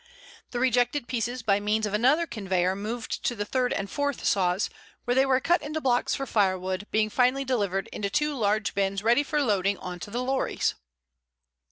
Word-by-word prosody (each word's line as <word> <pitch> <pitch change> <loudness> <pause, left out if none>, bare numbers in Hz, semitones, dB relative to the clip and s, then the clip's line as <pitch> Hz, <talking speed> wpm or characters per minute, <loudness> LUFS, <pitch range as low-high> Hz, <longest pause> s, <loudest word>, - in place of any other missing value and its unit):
The 245 - -3
rejected 245 +1 +1
pieces 245 0 -2
by 200 -2 +3
means 210 +1 0
of 210 - -4
another 265 +10 +3
conveyor 190 - -1
moved 220 +4 -4
to 240 - 0
the 205 -1 -3
third 250 +2 0
and 195 - -2
fourth 285 +5 -2
saws, 185 0 +2 0.4
where 245 - +1
they 265 +2 +3
were 260 -1 +3
cut 345 +6 +2
into 305 +2 -3
blocks 250 -4 +1
for 275 - -3
firewood, 190 -3 0
being 215 0 +1
finally 255 +3 +2
delivered 200 -7 -1
into 200 -1 -2
two 295 +9 0
large 215 -4 0
bins 195 0 -1
ready 235 +5 +4
for 295 0 0
loading 200 -4 +1
on 180 -1 -7
to 205 - -7
the 240 +4 -2
lorries. 265 +1 0
225 Hz, 190 wpm, -27 LUFS, 200-260 Hz, 0.4 s, ready